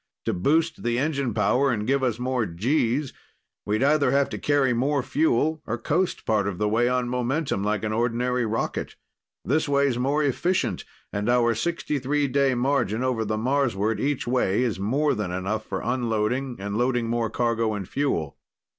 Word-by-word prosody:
To - - 0
boost 160 - +1
the 120 0 0
engine 140 -2 0
power 115 +7 +2
and 105 -4 -1
give 135 +2 +1
us 120 -4 0
more 125 -2 -1
Gs, 125 - 0 0.5
we'd 105 +4 +1
either 145 -1 +3
have 140 +1 +2
to - - -5
carry 140 -4 +2
more 135 +3 +1
fuel 155 +2 +1
or 115 - -1
coast 170 +10 -1
part 105 -3 +1
of 95 -3 -3
the 105 - 0
way 115 +3 +2
on 125 -1 0
momentum, 125 -2 -1
like 105 0 -1
an 110 0 -1
ordinary 120 +2 0
rocket. 115 0 -2 0.5
This 150 +3 +1
way's 140 -3 +2
more 140 +4 +1
efficient, 170 +6 0 0.3
and 105 +3 -1
our 120 -1 +3
63 145 0 -1
day 135 0 +2
margin 125 -3 0
over 125 -3 0
the 110 0 -2
Marsward 115 -4 0
each 145 -1 -1
way 120 -3 +1
is 110 -7 -1
more 135 +10 +1
than 105 -5 -3
enough 95 +5 -3
for - - -3
unloading 120 +1 -1
and 100 +1 -4
loading 120 -1 +1
more 115 -1 0
cargo 115 -1 0
and 100 -3 -5
fuel." 80 - -2
125 Hz, 175 wpm, -25 LUFS, 110-140 Hz, 0.5 s, either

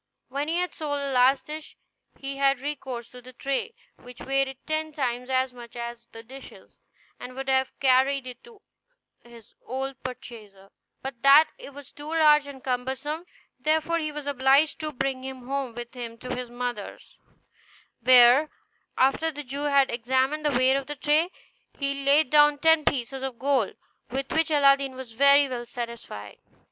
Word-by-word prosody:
When 280 +3 -3
he 325 - -1
had 360 0 -1
sold 290 -2 -3
the 280 -1 -3
last 260 +1 +3
dish 305 +1 -8 0.4
he 275 0 -6
had 275 -1 +2
recourse 260 -4 -5
to 250 - -13
the 255 +1 -14
tray, 275 - -3 0.2
which 245 0 -14
weighed 270 -1 -1
ten 310 0 -2
times 250 -3 -2
as 260 -1 +1
much 240 -1 -12
as 235 0 -7
the 225 0 -11
dishes, 265 +3 -13 0.4
and 250 +1 -9
would 270 0 -6
have 265 0 0
carried 265 +1 +3
it 250 -1 -10
to 455 -3 -18 0.6
his 235 -2 -16
old 265 +2 -5
purchaser, 225 -6 -10 0.3
but 265 -3 -6
that 285 +3 +7
it 275 - -11
was 285 -1 -11
too 290 +1 -10
large 300 -2 +4
and 270 -2 -10
cumbersome; 265 +6 -3 0.3
therefore 315 +4 +1
he 310 -1 -3
was 295 -1 -7
obliged 280 +2 +3
to 310 -1 -3
bring 270 -1 -2
him 260 -2 -8
home 270 -3 -3
with 240 0 -8
him 235 -2 -7
to 250 - -5
his 250 -1 -6
mother's, 245 0 -6 0.8
where, 250 +4 +7 0.5
after 270 +5 +2
the 295 -1 -7
Jew 280 +2 -4
had 280 -2 +3
examined 260 +5 0
the 290 -4 +1
weight 260 +1 +4
of 275 -1 -5
the 295 - -5
tray, 300 +4 +2 0.5
he 275 0 -2
laid 280 0 +3
down 295 -1 +6
ten 320 0 +4
pieces 265 0 -1
of 265 -3 -5
gold, 265 -4 0 0.3
with 270 +2 -4
which 320 +1 +1
Aladdin 275 -3 +3
was 260 -2 -9
very 280 +4 +5
well 240 -2 -5
satisfied. 235 - -8
270 Hz, 175 wpm, -26 LUFS, 250-290 Hz, 0.8 s, that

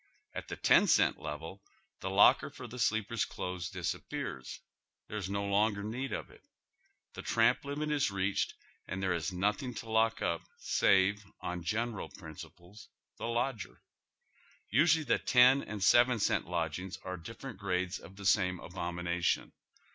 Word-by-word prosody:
At - - -6
the - - -5
ten - - +5
cent - - +4
level 80 +5 -6 0.4
the - - -3
locker - - +5
for - - -10
the 125 +1 -8
sleeper's 110 -1 +1
clothes 90 -2 -4
disappears. 65 -1 -4 0.5
There 105 - -5
is 95 -2 -4
no 100 0 -1
longer 100 +1 +1
need 125 +6 -4
of - - -4
it. - - -18 0.7
The - - -7
tramp - - +2
limit 145 +2 -3
is 145 -5 +2
reached, 100 0 -1 0.3
and 95 - -4
tliere 95 -2 +1
is 85 +3 -2
nothing 105 +7 -1
to 115 - -7
lock 110 0 +3
up 85 -1 0 0.2
save, 100 +2 +3 0.2
on 90 0 -4
general 110 +5 -2
principles, 90 +4 -12 0.3
the - - -3
lodger. 115 -3 -2 0.9
Usually 155 - +4
the - - +2
ten 130 +1 +6
and 105 -5 -5
seven 120 +3 +5
cent 100 - +1
lodgings 90 +2 -3
are 95 - -4
dif 90 +7 -9
ferent 135 -7 -8
grades 95 -2 -1
of 95 - -13
the 100 0 -9
same 90 -3 +3
abomination. 85 0 -2
100 Hz, 155 wpm, -32 LUFS, 90-115 Hz, 0.9 s, ten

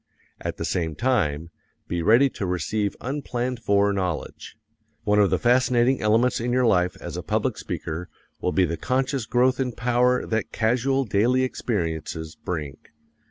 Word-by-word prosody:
At - - -4
the - - -3
same 80 -3 -1
time, 85 - 0 0.4
be 85 -1 -2
ready 115 +10 +5
to 95 - -4
receive 100 +4 -1
unplanned 125 -2 -3
for 100 -2 +2
knowledge. 90 -4 -4 0.5
One 105 -1 +3
of 100 -2 +5
the - - +2
fascinating 125 +1 +3
elements 115 +4 +2
in 120 +2 -1
your 125 0 +2
life 90 -5 +2
as - - -6
a - - -3
public - - -1
speaker 85 +3 -5 0.3
will 90 - 0
be 95 0 +3
the 85 0 -3
conscious 130 - -1
growth 125 +2 +2
in 125 -2 -1
power 125 +1 +2
that 110 -2 -2
casual 130 +4 +1
daily 120 +5 +2
experiences 80 -9 -3
bring. 75 -6 -5
110 Hz, 160 wpm, -24 LUFS, 90-125 Hz, 0.5 s, ready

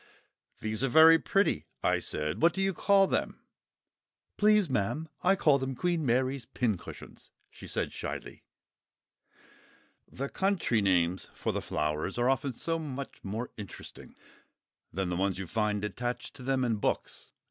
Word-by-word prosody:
"These 110 +1 -3
are - - +3
very 160 +5 +8
pretty," 195 +4 +1 0.2
I - - +3
said. 75 +6 -2
"What 170 -1 +4
do 195 - -1
you 195 0 +1
call 195 +3 +4
them?" - - -1 1.0
"Please, 210 -2 +4
ma'am, 135 +5 -1
I 190 +2 +4
call 150 -7 +4
them 130 0 -3
'Queen 170 +3 0
Mary's 130 0 0
Pincushions,'" 120 -7 -4 0.2
she - - -11
said - - -2
shyly. - - -6 1.7
The 135 +2 -4
country 190 - +1
names 90 -2 +1
for - - -2
the - - -2
flowers 75 +6 -2
are 120 +2 +3
often 135 0 -1
so 165 +7 -2
much 140 -3 -6
more 110 +5 -4
interesting 105 -4 -10 0.8
than 95 +1 -2
the 90 - -1
ones 95 +1 0
you 95 - -4
find 105 +1 -1
attached 120 +3 -4
to - - -11
them 130 0 0
in 115 -3 0
books. - - -3
125 Hz, 150 wpm, -30 LUFS, 105-160 Hz, 1.7 s, very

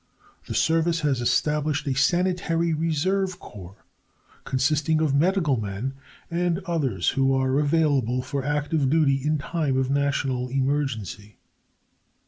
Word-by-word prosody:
The - - -4
Service 165 +1 +2
has 140 -5 0
established 150 +3 0
a 140 - 0
Sanitary 170 +3 +1
Reserve 180 +4 0
Corps, 95 -1 -12 0.6
consisting 150 +4 +1
of 155 -3 +1
medical 150 - +2
men 105 +6 -4 0.4
and 175 0 0
others 135 - 0
who 135 -1 +1
are 130 +1 +1
available 145 -5 +1
for 135 +1 -3
active 145 0 0
duty 140 -3 +2
in 155 +1 +1
time 150 -2 -1
of 130 0 0
national 140 -3 0
emergency. 130 - -2
145 Hz, 120 wpm, -24 LUFS, 130-160 Hz, 0.6 s, Service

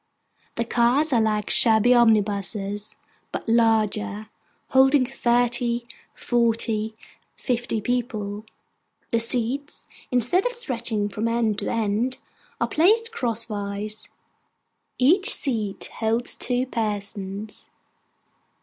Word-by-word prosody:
The 235 - -2
cars 245 +6 +2
are 235 - +3
like 215 -1 0
shabby 225 +2 +6
omnibuses, 210 -2 +1 0.4
but - - -6
larger: 220 -2 +1 0.4
holding 265 0 +4
thirty, 240 -1 0 0.3
forty, 225 -2 0 0.4
fifty, 240 -3 -2
people. 215 -4 -3 0.7
The 230 - +2
seats, 245 +5 -2 0.2
instead 250 - +2
of - - -4
stretching 235 - -2
from 215 +2 -3
end 230 -3 0
to - - -3
end, 225 +3 -1 0.4
are - - 0
placed 445 +8 +2
crosswise. 215 - -3 0.9
Each 365 - +3
seat 220 -7 -3
holds 225 +2 0
two 250 0 -1
persons. 210 -3 -4
230 Hz, 95 wpm, -23 LUFS, 215-245 Hz, 0.9 s, shabby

